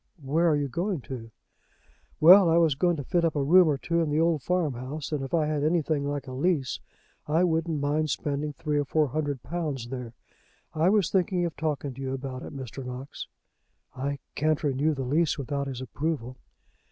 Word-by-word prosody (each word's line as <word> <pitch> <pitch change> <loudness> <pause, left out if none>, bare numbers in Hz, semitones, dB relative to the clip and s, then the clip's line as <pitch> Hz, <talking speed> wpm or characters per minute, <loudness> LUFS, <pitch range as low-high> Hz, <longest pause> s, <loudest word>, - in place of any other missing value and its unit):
"Where 160 +6 +2
are 155 - +3
you 145 -1 0
going 175 +4 -2
to?" 120 -3 -7 0.9
"Well, 180 +3 +8
I 165 - +4
was 165 -3 +4
going 175 +5 +1
to 145 - -5
fit 170 +5 0
up 165 -2 +1
a 145 - +1
room 175 +5 +6
or 145 -3 +2
two 170 +4 0
in 160 - 0
the 150 +1 +1
old 165 -2 +2
farmhouse; 145 -4 -2
and 145 -3 -1
if 135 - -6
I 160 -2 +2
had 150 -1 -1
anything 155 -3 +1
like 145 -1 -3
a 130 - -8
lease, 140 0 0 0.5
I 160 +4 +3
wouldn't 165 -2 0
mind 150 +2 0
spending 145 +1 -2
three 150 0 -1
or 145 - 0
four 150 +1 +1
hundred 145 -2 -2
pounds 150 -8 -3
there. 125 -3 -6 0.6
I 160 +3 +3
was 200 -4 +2
thinking 180 -1 +1
of 170 - -4
talking 145 -3 -2
to 135 - -9
you 135 0 -2
about 130 -1 -6
it, - - -8
Mr. 135 -1 -7
Knox." 125 +2 -7 0.7
"I 140 +2 -2 0.2
can't 155 +1 0
renew 145 +2 +1
the 135 - -3
lease 150 +5 +1
without 140 0 -3
his 130 -2 -5
approval." 130 -1 -3
150 Hz, 200 wpm, -27 LUFS, 135-165 Hz, 0.9 s, Well